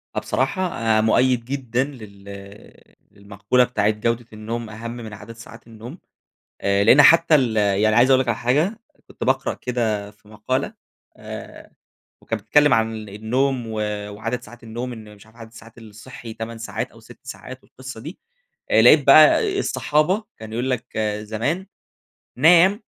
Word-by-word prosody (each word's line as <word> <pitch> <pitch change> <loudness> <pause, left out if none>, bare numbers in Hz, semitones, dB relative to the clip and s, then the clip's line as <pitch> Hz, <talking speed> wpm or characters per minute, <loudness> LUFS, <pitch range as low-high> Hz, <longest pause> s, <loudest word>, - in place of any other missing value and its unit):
آه، - - +1
بصراحة 130 - 0
مؤيد 120 +2 +2
جدًا 130 -2 -2
لل 100 -6 -13 0.2
للمقولة 100 +5 0
بتاعة 120 -4 0
جودة 115 +2 -2
النوم، 115 +1 -6
أهم 115 +2 -7
من 115 -3 -9
عدد 105 +2 -11
ساعات 115 0 -14
النوم. 115 - -11 0.6
آآ، 100 0 +1
لأن 125 +7 +7
حتى 165 0 +6
ال 120 -6 +1
يعني 105 +1 +2
عايز 125 +2 +5
أقول 130 - +5
لك 130 - -5
على 120 - 0
حاجة، 150 - 0 0.3
كنت - - -8
باقرأ 130 +1 0
كده 110 -5 -3
في 105 0 -27
مقالة، 110 +5 -3 0.4
آآ - - -10 0.5
وكانت 115 -2 -4
بتتكلم 150 +2 +4
عن 110 -1 -2
النوم 120 +5 -1
و 110 - -7 0.4
وعدد 115 +4 -4
ساعات 120 +2 -14
النوم، 120 +3 -6
إن 110 -2 -11
مش 100 +1 -19
عارف 110 +2 -22
عدد 115 -1 -12
الساعات 115 0 -15
الصحي 110 +1 -11
8 115 0 -7
ساعات 115 - -5
أو - - -18
6 - - -16
ساعات - - -10
والقصة 130 -3 -11
دي. 155 - -9 0.5
آآ - - +5
لقيت - - +6
بقى 400 -4 +6
الصحابة، 185 - 0
كان 110 0 -10
يقول 125 +3 -2
لك 120 -2 -4 0.2
زمان، 120 - -3 0.7
نام 175 - +5
115 Hz, 155 wpm, -21 LUFS, 110-130 Hz, 0.7 s, لأن